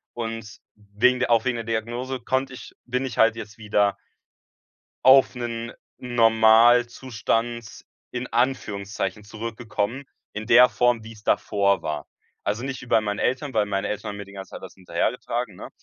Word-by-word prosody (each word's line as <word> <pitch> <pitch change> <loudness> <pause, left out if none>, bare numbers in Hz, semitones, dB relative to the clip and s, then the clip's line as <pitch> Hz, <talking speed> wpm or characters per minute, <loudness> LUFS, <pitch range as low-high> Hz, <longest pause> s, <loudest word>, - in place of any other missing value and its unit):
Und 115 -2 -5 0.2
wegen 105 +5 +1
der 130 - 0
auch 115 -1 +4
wegen 130 -2 +1
der 115 - -4
Diagnose 120 +3 -3
konnte 130 +2 -1
ich - - -11
bin 125 +2 -1
ich 120 - -6
halt 115 0 +5
jetzt 105 -2 -9
wieder 105 -2 +1 1.1
auf 135 +1 +7
'nen 115 -1 -4 0.3
Normalzustand, 115 0 +2 0.3
in 125 0 -4
Anführungszeichen, 105 -5 -2
zurückgekommen, 115 +3 -4 0.3
in 105 +1 -5
der 125 +3 +7
Form, 120 -2 +1
wie's 110 -1 -12
davor 100 -3 +1
war. 75 -2 -4 0.4
Also, 105 +4 -2
nicht 135 -1 -4
wie - - -10
bei 110 - +4
meinen 105 -1 -3
Eltern, 130 +2 -1
weil 105 -2 +2
meine 100 0 -2
Eltern 105 - -4
haben 100 - -6
mir 100 - -7
die 100 - -15
ganze 95 -1 -9
Zeit - - -8
das - - -9
hinterhergetragen, 105 +5 -2
ne? - - -9
115 Hz, 165 wpm, -24 LUFS, 105-125 Hz, 1.1 s, auf